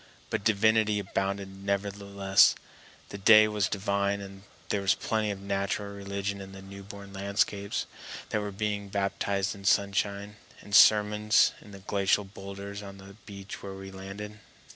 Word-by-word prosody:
But - - -1
divinity 110 0 +3
abounded 95 0 -3
nevertheless; 100 0 +2 0.5
the 100 - -7
day 110 +2 +7
was 105 -2 0
divine 100 0 0
and 95 -1 -10 0.3
there 100 - 0
was 100 0 +3
plenty 110 -1 -1
of 100 -1 -4
natural 100 +1 -2
religion 100 0 -4
in 95 0 -10
the 95 - -10
newborn 100 0 -10
landscapes 100 0 -1 0.4
that 110 - 0
were 105 0 -4
being 100 0 -3
baptized 100 0 -1
in 100 -2 -12
sunshine, 100 +1 0 0.2
and 100 - -12
sermons 105 +1 +6
in - - -15
the 100 - -10
glacial 100 0 +2
boulders 100 +1 -8
on 100 -1 -10
the 95 0 -13
beach 100 -1 -8
where 100 -1 -7
we 95 0 -9
landed. 100 +2 -8
100 Hz, 150 wpm, -28 LUFS, 100-105 Hz, 0.5 s, day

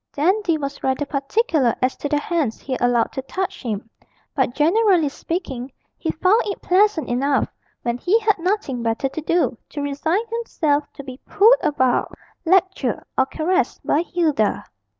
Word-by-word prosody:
Dandy 345 +3 +1
was 280 -1 -5
rather 265 +2 0
particular 280 - +1
as 255 +1 +1
to 290 - -4
the 295 - +2
hands 295 -7 -1
he 265 - -4
allowed 245 -1 +2
to 265 - -4
touch 380 +8 -4
him, 225 -3 -4 0.5
but 260 -3 0
generally 350 0 +3
speaking, 275 -5 -5 0.2
he 325 - -4
found 370 +9 +3
it 400 - -4
pleasant 380 -2 +2
enough 275 +3 +1 0.4
(when 240 0 -1
he 385 - +3
had 425 -3 +1
nothing 350 - -1
better 230 +4 -1
to 315 - -5
do) 335 -3 +1
to 290 - -6
resign 320 +9 -1
himself 310 -11 -1
to 280 - -9
be 260 -1 -9
pulled 430 +4 +6
about, 260 -4 +1 0.3
lectured, 370 - +1
or 265 - +2
caressed 360 +6 -1
by 300 - +2
Hilda. 320 - 0
300 Hz, 160 wpm, -21 LUFS, 265-370 Hz, 0.5 s, pulled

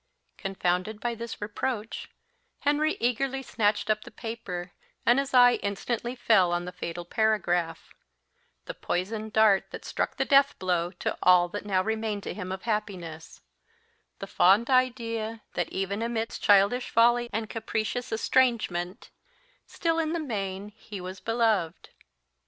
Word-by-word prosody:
Confounded 195 +1 -1
by 240 +1 -2
this 230 0 -7
reproach, 215 +1 -4 0.5
Henry 295 +2 +2
eagerly 265 +3 0
snatched 210 -4 0
up 215 0 +1
the - - -11
paper, 185 -6 -6 0.3
and 240 +3 +5
his 275 0 -2
eye 245 -1 +6
instantly 235 +4 -3
fell 195 -8 +4
on 175 0 -1
the 180 - -5
fatal 175 -1 -6
paragraph 175 -5 0 0.7
the - - -5
poisoned 215 +4 -3
dart 215 -3 +4
that - - -9
struck - - -2
the - - +1
death 280 0 +4
blow 175 -2 0
to 175 - -3
all 180 -1 +6
that 205 +2 -6
now 185 -2 +2
remained 220 -1 -2
to - - -4
him 185 -3 -6
of 190 0 -5
happiness 185 -8 -4 0.8
the - - -6
fond 205 +8 +4
idea 230 -3 0
that, 175 -2 -1
even 195 +2 -2
amidst 230 -1 -3
childish 205 +5 +4
folly 240 +1 +4
and 220 +1 -2
capricious 225 +3 -3
estrangement, 225 -5 0 0.6
still 330 -1 -1
in 320 0 0
the 340 - -1
main 200 -8 -4
he 210 -1 -10
was 185 +1 -7
beloved! 220 -7 0
215 Hz, 145 wpm, -27 LUFS, 185-235 Hz, 0.8 s, eye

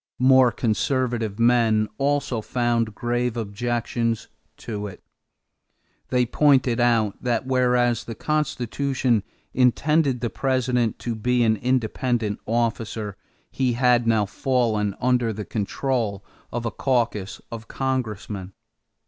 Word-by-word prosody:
More 130 -1 +5
conservative 115 -1 -1
men 115 -2 +3
also 140 -4 0
found 115 -2 0
grave 120 0 -1
objections 115 +1 -2 0.3
to 105 -2 -5
it. 100 - -11 1.0
They 125 -1 +2
pointed 130 -2 +3
out 115 -4 +2
that, 120 0 0
whereas 125 -2 +2
the 115 - -7
Constitution 135 -3 0 0.3
intended 135 +1 +2
the 120 - -2
President 125 -3 0
to 120 - -3
be 120 +2 +1
an 110 -1 +3
independent 120 -2 0
officer, 110 -2 -1 0.4
he 130 -2 0
had 120 -1 +3
now 110 -2 +3
fallen 110 -3 0
under 125 -2 +2
the 105 -1 -5
control 110 -1 -2 0.3
of 120 0 -3
a 115 - -1
caucus 115 -5 -1
of 115 -1 -7
congressmen. 110 -7 -3
120 Hz, 115 wpm, -24 LUFS, 110-125 Hz, 1.0 s, More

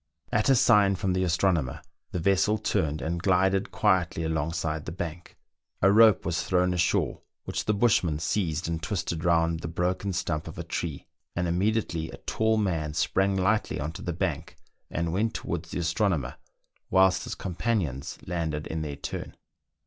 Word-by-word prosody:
At 110 - +2
a 135 - +6
sign 105 -5 +5
from 95 0 -1
the 95 0 +1
astronomer 85 -6 +1 0.3
the - - -2
vessel 100 +4 +2
turned, 75 -6 -1
and 85 +1 -2
glided 95 +1 +2
quietly 95 -5 +1
alongside 80 -1 -2
the - - -4
bank; 85 0 -6 0.4
a 95 - +5
rope 110 -1 +6
was 85 +1 0
thrown 90 -1 +2
ashore, 90 -1 +1 0.2
which - - -3
the 105 - +2
bushman 100 -8 +2
seized 80 0 -1
and 85 -1 -2
twisted 85 -4 -3
round 85 -1 +2
the 85 - -5
broken 90 +4 -1
stump 85 -3 -2
of - - -8
a - - -4
tree, 80 -5 -4 0.3
and 85 0 0
immediately 90 -2 0
a - - -9
tall 110 0 0
man 80 -8 -1
sprang 95 +5 +1
lightly 105 +3 +1
on 75 +3 -3
to 80 - -9
the - - -3
bank, - - -3 0.3
and 85 -1 -2
went 110 +4 0
towards 85 0 -4
the - - -4
astro 85 +5 +1
nomer, 70 -9 -2 0.5
whilst 95 0 +4
his - - -4
companions 85 - -2
landed 80 -4 -2
in 80 0 -3
their 75 -2 -4
turn. 70 - -6
85 Hz, 170 wpm, -27 LUFS, 80-95 Hz, 0.5 s, a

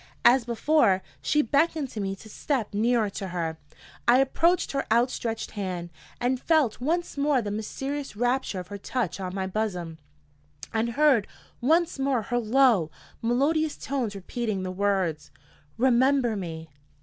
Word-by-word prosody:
As 245 0 +6
before, 235 -5 +2 0.2
she 300 - +2
beckoned 290 +3 +1
to 215 - -6
me 195 0 -2
to 205 - -14
step 230 -1 -2
nearer 225 +1 +2
to 195 - -5
her. 165 -3 -3 0.5
I 245 - +7
approached 330 +6 +2
her 275 -1 -2
outstretched 230 -1 0
hand, 180 -4 -4 0.3
and 250 +1 0
felt 305 -9 +2
once 335 +4 -1
more 285 -1 +3
the 210 -3 -3
mysterious 270 +6 -4
rapture 245 -3 0
of 180 0 -8
her 200 - -6
touch 200 -4 -2
on 185 -1 -4
my 190 -1 -1
bosom, 180 -5 -3 0.7
and 230 +1 0
heard 275 -6 +4 0.3
once 320 +4 +2
more 270 -4 +1
her 245 +3 -1
low, 230 - +3 0.3
melodious 290 +7 +1
tones 255 -7 -3
repeating 200 0 -3
the 185 - -3
words: 185 -6 0 0.5
"Remember 255 -1 +3
me. 160 -5 -6
235 Hz, 150 wpm, -26 LUFS, 195-270 Hz, 0.7 s, I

